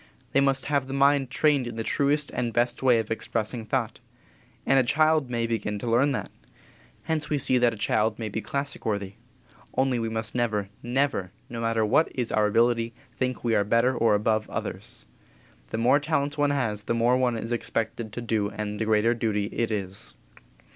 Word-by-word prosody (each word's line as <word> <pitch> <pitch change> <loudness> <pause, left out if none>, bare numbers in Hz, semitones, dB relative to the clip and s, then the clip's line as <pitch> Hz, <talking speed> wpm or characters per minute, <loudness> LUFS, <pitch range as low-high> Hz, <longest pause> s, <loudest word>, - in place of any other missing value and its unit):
They - - +3
must 135 -1 +1
have 140 -2 0
the 135 - -4
mind 140 -1 +3
trained 140 -2 +2
in 120 - -6
the 115 - -3
truest 145 +4 +1
and 120 -2 -2
best 120 +1 0
way 125 -3 +5
of 110 -1 -2
expressing 115 +1 -2
thought. 115 0 -2 0.7
And 135 0 +4
a - - +4
child 155 +1 +2
may 120 -1 -1
begin 110 -2 -2
to 110 - -5
learn 125 +5 +3
that. - - -4 0.7
Hence 155 -1 -1
we 150 - +1
see 130 -2 +2
that 120 -1 +4
a 115 - -8
child 110 +1 +1
may 115 - -4
be 110 +1 -3
classic 140 +3 -3
worthy. 100 -3 -2 0.6
Only 130 -2 +2
we 115 -1 -2
must 110 -1 -2
never, 110 -5 -1
never, 125 -7 0 0.2
no 115 -1 -4
matter 115 -1 +1
what 155 +9 +3
is 125 -4 -1
our 105 -1 +3
ability, 115 +1 +2 0.2
think 130 -1 -2
we 115 -2 +1
are 100 - +3
better 115 +5 +2
or 115 -3 +3
above 110 +1 0
others. - - -6 0.6
The - - -3
more 125 +5 +4
talents 145 -1 -1
one 145 -1 +2
has 120 -7 -1
the 115 - 0
more 120 +2 +3
one 125 -2 +1
is 115 +1 -5
expected 115 -1 -2
to 120 - -4
do 110 -3 0
and 105 -1 -5
the 110 - 0
greater 110 +2 +3
duty 105 -3 -1
it 115 - 0
is. 100 -3 -4
120 Hz, 200 wpm, -26 LUFS, 110-135 Hz, 0.7 s, way